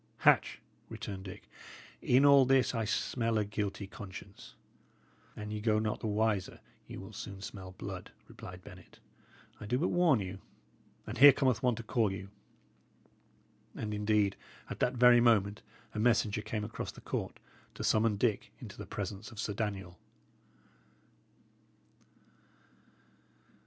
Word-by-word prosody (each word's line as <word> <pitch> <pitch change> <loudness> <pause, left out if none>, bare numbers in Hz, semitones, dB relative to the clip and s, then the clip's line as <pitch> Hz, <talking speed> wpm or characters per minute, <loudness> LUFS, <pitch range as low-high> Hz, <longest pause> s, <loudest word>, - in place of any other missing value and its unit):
"Hatch," - - +4 0.3
returned 95 -1 -6
Dick, 95 - -10 0.5
"in 130 +3 +4
all 140 -1 +8
this 130 -1 +3
I 115 -2 -1
smell 115 +1 0
a 105 - +1
guilty 100 -1 -3
conscience." 100 -2 -10 0.8
"An 105 0 -6
ye 105 0 -4
go 110 -1 +2
not 110 0 -1
the - - -3
wiser, 105 -2 0 0.3
ye - - -8
will 95 +3 -9
soon 100 -2 -7
smell 95 -1 -8
blood," 95 -1 -7 0.2
replied 90 0 -11
Bennet. - - -14 0.6
"I 105 - -8
do 125 +4 +1
but 165 - +1
warn 175 -8 +4
you. 95 -1 -5 0.7
And 115 +2 -6
here 145 +2 +11
cometh 130 -4 +1
one 125 -2 +2
to 115 - -7
call 110 -2 +1
you." 95 0 -7 1.5
And 105 -1 -4
indeed, 105 -1 +1 0.4
at - - -6
that 125 - +1
very 125 0 +7
moment, 105 -3 +3 0.3
a 105 - -3
messenger 110 -2 +2
came 110 0 -3
across 105 - -5
the - - -14
court - - -4 0.4
to - - -5
summon 110 -1 +2
Dick 110 -1 0
into - - -10
the - - -7
presence 100 +2 -5
of 110 - -11
Sir 105 -1 -2
Daniel. 95 -4 -4
105 Hz, 145 wpm, -32 LUFS, 100-115 Hz, 1.5 s, here